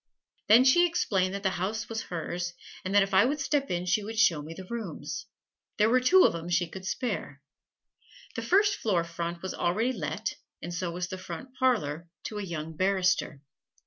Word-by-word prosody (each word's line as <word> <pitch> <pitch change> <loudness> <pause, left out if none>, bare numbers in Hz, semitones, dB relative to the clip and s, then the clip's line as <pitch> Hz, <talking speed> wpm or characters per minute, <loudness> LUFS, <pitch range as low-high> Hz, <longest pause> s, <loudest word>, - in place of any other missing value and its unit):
Then 225 +4 +8
she 345 +7 +6
explained 195 - 0
that 200 - -5
the 190 - +2
house 215 +4 -2
was 225 -1 -3
hers, 175 +1 -4 0.3
and 190 +2 -2
that 205 - +7
if 195 0 -5
I 190 - +7
would 285 +5 0
step 280 0 0
in 175 0 -1
she 205 +3 +1
would 220 +2 -6
show 180 -9 +4
me 160 +3 -8
the 190 - -8
rooms. 230 +2 -5 0.5
There 215 +1 +4
were 255 - +5
two 365 +9 +6
of - - +4
'em 170 +1 -5
she 175 0 +2
could 190 +3 -8
spare. 200 - -3 1.0
The - - -2
first 405 +1 +3
floor 185 -6 +1
front 170 +1 -5
was 190 - -3
already 220 +9 0
let, 155 - -3 0.2
and 175 +2 -6
so 175 +1 -2
was 180 +1 -4
the 185 -1 -6
front 185 +8 -8
parlor 170 - 0 0.2
to 210 - -5
a - - -3
young 160 -3 -5
barrister. 185 -5 +1
190 Hz, 200 wpm, -28 LUFS, 175-230 Hz, 1.0 s, Then